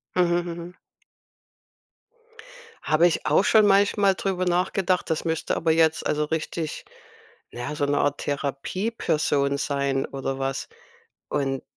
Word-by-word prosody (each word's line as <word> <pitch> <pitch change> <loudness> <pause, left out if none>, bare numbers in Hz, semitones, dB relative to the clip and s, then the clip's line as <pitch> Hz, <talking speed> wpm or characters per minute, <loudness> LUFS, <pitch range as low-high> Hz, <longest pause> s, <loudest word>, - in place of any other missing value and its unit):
Mhm, 175 -1 +3
mhm. 170 +1 -8 2.1
Habe 165 +3 +4
ich 165 - -2
auch - - +3
schon 215 -2 +5
manchmal 200 0 +4
drüber 185 -2 -2
nachgedacht. 180 0 0
Das 160 +1 -1
müsste 160 -1 -1
aber 160 0 +1
jetzt 160 0 +2
also 150 0 0
richtig, 160 0 -4 0.7
naja, 120 +5 -5
so 145 - -1
'ne 145 - +1
Art 145 0 0
Therapieperson 145 -1 -1
sein 140 -1 -1
oder 135 0 -4
was. 135 0 -3 0.6
Und 135 -2 -1
160 Hz, 120 wpm, -24 LUFS, 140-180 Hz, 2.1 s, schon